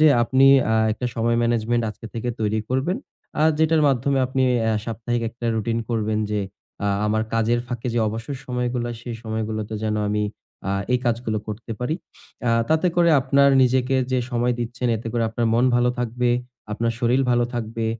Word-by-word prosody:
যে 155 - +7
আপনি, 130 +3 +4 0.3
আ - - +3 0.2
একটা 125 +3 -3
সময় 115 +1 +1
ম্যানেজমেন্ট 120 0 +1
আজকে 110 - -10
থেকে 115 +1 -3
তৈরি 110 0 0
করবেন। 130 +8 0 0.4
আর 155 - +5
যেটার 160 0 +3
মাধ্যমে 135 +1 +1
আপনি 130 +1 0 0.3
এহ 110 - +2
সাপ্তাহিক 115 +1 -2
একটা 120 +1 -6
রুটিন 115 +1 -1
করবেন, 110 -2 0
যে, 105 -1 0 0.4
আ - - +1 0.2
আমার 110 +1 +1
কাজের 115 +1 +2
ফাঁকে 120 0 -5
যে - - +2
অবসর 115 +6 -5
সময়গুলো 125 -1 -2
হয়, 120 - -5
সেই 120 -1 -5
সময়গুলোতে 110 0 -3
যেন 110 -1 0
আমি, 105 0 0 0.4
আ - - 0 0.2
এই 125 - +3
কাজগুলো 115 -2 0
করতে 110 +2 -5
পারি। 125 +6 -1 0.5
আ - - +4 0.2
তাতে 160 +3 +2
করে 170 -1 +5
আপনার 140 +1 +4
নিজেকে 130 +1 +2 0.2
যে 130 - +3
সময় 120 +1 +1
দিচ্ছেন, 120 +1 -2
এতে 110 - -8
করে 120 - 0
আপনার 115 +1 -1
মন 120 +2 +3
ভালো 120 0 +3
থাকবে, 125 0 0 0.4
আপনার 115 +2 0
শরীর 125 +3 +2
ভালো 120 0 +3
থাকবে, 115 -1 -3
120 Hz, 185 wpm, -23 LUFS, 110-125 Hz, 0.5 s, যে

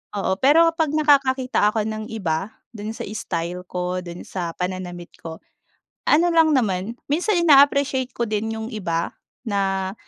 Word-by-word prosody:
Oo, 190 -1 0
pero 295 +5 +6
kapag 320 -3 -1
nakakakita 270 -6 +3
ako 220 - +2
ng 215 0 -5
iba 190 -2 -3 0.2
do'n 215 0 -6
sa - - -8
style 180 -4 -4
ko, 180 0 -3
do'n 175 -1 -8
sa 170 -3 -5
pananamit 180 -1 -5
ko, 160 -1 -9 0.7
ano 330 +4 +5
lang 320 -1 +5
naman 220 -3 0
minsan 350 +6 +1
in-appreciate 280 -3 +4
ko 235 - -2
din 215 +1 -2
yung 220 - -5
iba 170 -5 -2 0.3
na, 195 -2 -1
215 Hz, 150 wpm, -22 LUFS, 180-275 Hz, 0.7 s, pero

